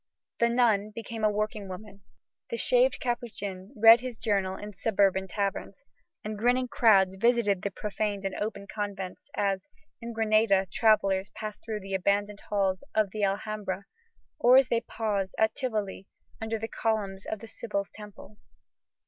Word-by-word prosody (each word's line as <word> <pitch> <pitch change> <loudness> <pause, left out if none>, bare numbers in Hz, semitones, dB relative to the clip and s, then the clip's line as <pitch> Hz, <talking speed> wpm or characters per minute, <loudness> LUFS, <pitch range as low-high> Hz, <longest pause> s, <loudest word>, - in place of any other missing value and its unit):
The 235 - +4
nun 225 -4 +2
became 225 0 -6
a 215 - +5
working 210 -1 -2
woman; 200 +1 -9 0.5
the 470 - -3
shaved - - +3
Capuchin 210 -6 -4
read 225 +2 +9
his 250 -2 -6
journal 200 -4 0
in 210 0 -8
suburban 195 -2 +1
taverns; 200 +4 -3 0.4
and 215 -1 -5
grinning 250 +3 +2
crowds 195 -5 +4
visited 225 -3 +2
the 200 - -1
profaned 205 0 -3
and 195 - -2
open 205 -1 -4
convents 200 +2 -5
"as, 195 -2 -1 0.3
in 235 0 -5
Grenada, 215 -3 +3
travellers 195 -4 +3
pass 215 -1 -5
through 215 -2 -4
the 195 0 -7
abandoned 200 +2 0
halls 195 -3 0
of 215 -3 +2
the 215 0 -3
Alhambra, 200 -1 -2 0.5
or 250 +2 +7
as 265 -1 +5
they 235 -1 +2
pause, 210 -5 -2
at 220 0 +3
Tivoli, 215 -7 -3 0.3
under 225 0 -2
the 225 +1 -4
columns 205 -4 -2
of 220 - -3
the 225 - -11
Sibyl's 200 -3 -4
temple." 210 0 -12
210 Hz, 155 wpm, -28 LUFS, 195-225 Hz, 0.5 s, read